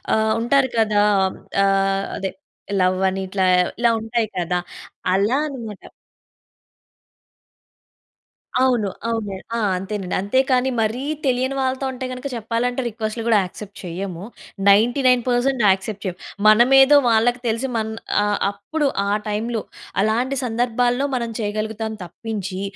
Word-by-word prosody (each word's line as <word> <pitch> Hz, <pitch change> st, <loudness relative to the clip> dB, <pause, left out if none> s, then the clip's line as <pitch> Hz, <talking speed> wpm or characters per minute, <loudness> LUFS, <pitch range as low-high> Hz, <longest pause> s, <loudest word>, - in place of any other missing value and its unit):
ఆహ్, 220 Hz, 0 st, +2 dB
ఉంటారు 260 Hz, +2 st, +3 dB
కదా 215 Hz, -2 st, +3 dB, 0.6 s
ఆహ్, 195 Hz, 0 st, +2 dB
అదే 190 Hz, -, -3 dB, 0.5 s
లవ్ 185 Hz, 0 st, +2 dB
అని 190 Hz, 0 st, -3 dB
ఇట్లా 190 Hz, 0 st, 0 dB, 0.3 s
ఇలా 235 Hz, -1 st, +4 dB
ఉంటాయి 225 Hz, 0 st, -1 dB
కదా. 180 Hz, 0 st, 0 dB, 0.5 s
అలా 205 Hz, +8 st, +2 dB
అన్నమాట. 230 Hz, -8 st, -8 dB, 2.8 s
అవును, 245 Hz, -6 st, +2 dB, 0.2 s
అవును. 220 Hz, -4 st, -2 dB, 0.2 s
ఆ! -, -, -1 dB, 0.2 s
అంతేనండి 190 Hz, -1 st, -4 dB
అంతే 205 Hz, +6 st, +1 dB
కానీ, 255 Hz, +1 st, +3 dB
మరి 220 Hz, +4 st, -1 dB, 0.2 s
తెలియని 260 Hz, +1 st, +1 dB
వాళ్ళతో 265 Hz, +1 st, -1 dB
అంటే 260 Hz, 0 st, -5 dB
గనుక 255 Hz, +2 st, -5 dB
చెప్పాలంటే 235 Hz, +3 st, -1 dB
రిక్వెస్ట్‌లు 225 Hz, 0 st, -4 dB
కూడా 220 Hz, -2 st, +5 dB
యాక్సెప్ట్ 200 Hz, +2 st, -9 dB
చేయము 180 Hz, +1 st, -5 dB, 0.5 s
99% 245 Hz, +3 st, +3 dB
యాక్సెప్ట్ 195 Hz, +2 st, 0 dB
చేయము. 180 Hz, -1 st, -4 dB, 0.3 s
మనమేదో 265 Hz, +6 st, +7 dB
వాళ్ళకి 235 Hz, +2 st, +3 dB
తెలిసి 230 Hz, +4 st, 0 dB
మన్ 220 Hz, 0 st, -2 dB, 0.3 s
ఆహ్, 205 Hz, 0 st, 0 dB
అప్పుడు 285 Hz, +9 st, -2 dB, 0.2 s
ఆ -, -, -2 dB, 0.2 s
టైంలో. 225 Hz, +2 st, -2 dB, 0.4 s
అలాంటి 240 Hz, +6 st, +1 dB
సందర్భాల్లో 245 Hz, +3 st, +1 dB
మనం 235 Hz, -2 st, -2 dB
చేయగలుగుతాం 220 Hz, +1 st, -3 dB
తప్పించి 195 Hz, +1 st, -5 dB
225 Hz, 120 wpm, -21 LUFS, 200-250 Hz, 2.8 s, మనమేదో